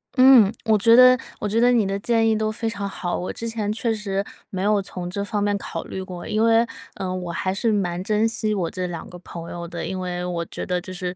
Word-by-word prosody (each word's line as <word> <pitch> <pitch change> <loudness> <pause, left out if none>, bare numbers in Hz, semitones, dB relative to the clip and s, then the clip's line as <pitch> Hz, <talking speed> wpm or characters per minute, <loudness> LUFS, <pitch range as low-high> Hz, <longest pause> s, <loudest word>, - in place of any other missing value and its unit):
嗯， 255 -6 +7
我 220 -1 +4
觉 230 +3 +6
得 255 +1 +8 0.2
我 210 - -2
觉 215 +3 +1
得 245 - +5
你 230 -4 +3
的 195 +1 -2
建 225 +1 +2
议 220 - +3
都 215 0 0
非 225 +1 -3
常 200 -3 -4
好， 175 -2 -3
我 180 - -4
之 230 - -5
前 220 -2 -2
确 225 +1 0
实 200 -2 -2 0.3
没 190 -1 -3
有 205 0 +3
从 180 -2 -6
这 200 +2 -2
方 205 -1 -2
面 205 0 +1
考 - - -5
虑 190 - -6
过。 180 -2 -8
因 215 - 0
为， 230 0 +4 0.3
呃， 185 -1 -3
我 180 -2 -4
还 185 +2 -1
是 220 +4 +1
蛮 180 -4 -1
珍 215 +2 +2
惜 220 -1 -1
我 175 -4 -2
这 180 -1 -3
两 170 -2 -6
个 180 - -10
朋 170 -1 -8
友 170 0 -6
的， 170 0 -5
因 190 -1 -4
为 180 -1 -3
我 175 -1 -2
觉 - - -6
得 180 -1 -1
就 185 - -9
是 180 -1 -4
200 Hz, 280 characters per minute, -23 LUFS, 180-225 Hz, 0.3 s, 得